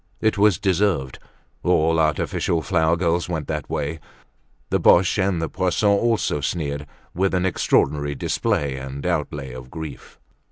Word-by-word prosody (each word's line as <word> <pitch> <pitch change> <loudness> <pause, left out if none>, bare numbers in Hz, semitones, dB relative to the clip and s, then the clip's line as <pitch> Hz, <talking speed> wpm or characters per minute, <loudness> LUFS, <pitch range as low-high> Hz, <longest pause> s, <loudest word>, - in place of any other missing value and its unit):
It 110 - +1
was 100 -3 +4
deserved; 95 - 0 0.4
all 80 -2 +2
artificial 80 +1 0
flower 85 -2 +2
girls 85 0 0
went 80 -5 -3
that - - -3
way. 75 +2 -3 0.7
The - - +2
Boches 85 +3 +4
and 95 -3 0
the 80 - -1
Poissons 100 +3 +1
also 115 -10 +1
sneered 75 -2 -3 0.3
with 95 +1 +1
an 90 0 +1
extraordinary 75 -5 +1
display 70 0 -1
and 70 +1 -7
outlay 65 -3 -2
of 65 0 -9
grief. 80 -2 -9
80 Hz, 145 wpm, -22 LUFS, 70-95 Hz, 0.7 s, was